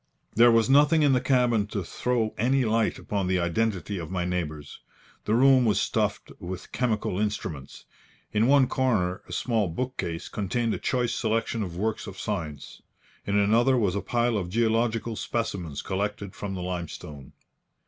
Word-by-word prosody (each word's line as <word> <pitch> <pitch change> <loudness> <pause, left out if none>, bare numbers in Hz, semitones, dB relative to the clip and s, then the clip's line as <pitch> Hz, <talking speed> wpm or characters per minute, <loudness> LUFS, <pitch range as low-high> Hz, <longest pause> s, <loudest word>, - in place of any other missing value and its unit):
There 120 +1 +6
was 115 -1 +4
nothing 150 +3 +5
in 140 -2 +4
the 125 - +2
cabin 125 -5 +2
to 100 -2 -3
throw 115 +4 -1
any 130 +3 +2
light 110 0 +1
upon 100 -3 -2
the 95 0 +2
identity 95 +1 -1
of 80 - -6
my 90 -1 -2
neighbours. 75 -5 -4 0.5
The 110 - +2
room 130 +1 +6
was 105 -4 +2
stuffed - - -1
with 90 +1 -7
chemical 110 -6 -1
instruments. 105 -10 -4 0.5
In 110 +2 +3
one 140 -1 +5
corner 115 -9 0
a - - -9
small 115 -5 0
bookcase 85 -3 -4
contained 110 +3 -1
a - - -3
choice 125 -2 0
selection 115 -1 -1
of 90 -4 -5
works 110 +3 -2
of 95 - -8
science. 80 -9 -5 0.5
In 100 0 +1
another 115 +6 +4
was 100 -6 +1
a 100 - -1
pile 120 -2 0
of 90 -2 -5
geological 115 +1 0
specimens 90 -11 -3
collected 100 0 -3
from 100 -2 -5
the 90 - -4
limestone. 85 -6 -6
105 Hz, 165 wpm, -26 LUFS, 90-120 Hz, 0.5 s, There